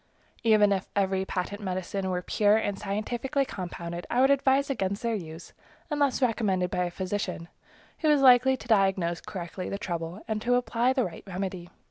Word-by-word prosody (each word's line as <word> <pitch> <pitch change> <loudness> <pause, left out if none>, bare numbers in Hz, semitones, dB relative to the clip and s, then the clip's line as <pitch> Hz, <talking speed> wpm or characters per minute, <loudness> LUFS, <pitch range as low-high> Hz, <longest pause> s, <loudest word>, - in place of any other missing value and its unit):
Even 215 -3 +4
if 190 -1 -1
every 190 -1 +1
patent 190 +3 -4
medicine 190 0 -3
were 180 -1 -2
pure 210 +3 +3
and 205 -3 -2
scientifically 240 +7 -1
compounded, 175 -4 -6
I 245 - +1
would 265 +2 +5
advise 275 0 +3
against 200 -4 -2
their 230 -1 0
use, 165 -5 -7 0.4
unless 285 -3 +1
recommended 195 -7 +1
by 180 - 0
a - - -2
physician, 185 -2 -4 0.5
who 310 - +2
is 295 -2 +4
likely 260 +1 +6
to - - -12
diagnose 195 -5 +2
correctly 180 0 -6
the 200 - -3
trouble 170 0 -5
and 215 -1 -2
to 245 +2 +2
apply 245 +1 +1
the 260 -2 +1
right 175 - -7
remedy. 185 -2 -4
200 Hz, 175 wpm, -27 LUFS, 185-245 Hz, 0.5 s, likely